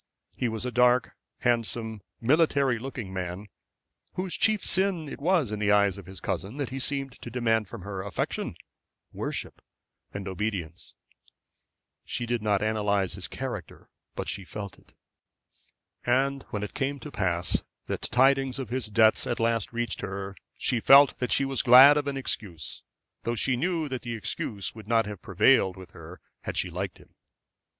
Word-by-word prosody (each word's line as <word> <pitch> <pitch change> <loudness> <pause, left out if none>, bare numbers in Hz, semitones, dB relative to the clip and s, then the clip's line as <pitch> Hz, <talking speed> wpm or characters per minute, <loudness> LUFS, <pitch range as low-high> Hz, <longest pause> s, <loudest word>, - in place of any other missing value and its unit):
He 125 - 0
was 110 +2 -3
a 125 - -2
dark, 125 +1 +4 0.3
handsome, 115 -2 0 0.2
military 140 -2 +3
looking 120 -6 -6
man, 95 +2 -5 0.6
whose 185 -1 -3
chief 215 -2 +2
sin 185 -4 +1
it 140 - -8
was 165 - +2
in 105 - -3
the 105 -1 +2
eyes 100 -1 +3
of 95 - -12
his 95 -1 -9
cousin 105 +9 -4
that 140 -4 -3
he 135 - -4
seemed 135 -1 -2
to - - -7
demand 115 -3 +1
from 105 -1 -9
her 100 -1 -5
affection, 100 +1 -3 0.6
worship, - - -4 0.5
and 100 -1 -6
obedience. 95 -4 -4 1.1
She 120 - -3
did 120 -1 -1
not 105 -1 +1
analyse 105 -3 +1
his - - -7
character, - - -7 0.2
but - - -4
she 100 - -3
felt 100 +1 -7
it. - - -25 1.1
And 135 +3 +1
when 105 -1 -3
it 105 - -5
came 140 0 -1
to 150 - -8
pass 90 -6 0 0.2
that - - -3
tidings 135 +1 +3
of 130 -5 -5
his 125 -1 -2
debts 110 +1 +4
at 120 - -1
last 115 -2 +1
reached 120 0 -2
her, 95 0 -5 0.2
she 120 - +1
felt 140 +4 +7
that 125 - -2
she 140 - +3
was 135 -1 0
glad 130 +3 +9
of 145 -1 0
an 140 -1 -2
excuse, 95 - -3 0.4
though 120 - -2
she 125 +3 +2
knew 165 +3 0
that 130 -2 -3
the 120 -1 -4
excuse 105 -2 -4
would 110 -2 -11
not 115 -1 +3
have 105 -3 -7
prevailed 95 0 +3
with 95 -1 -11
her 85 +2 -11 0.2
had - - -5
she 90 - 0
liked 90 +2 -4
him. - - -20
115 Hz, 175 wpm, -27 LUFS, 100-135 Hz, 1.1 s, glad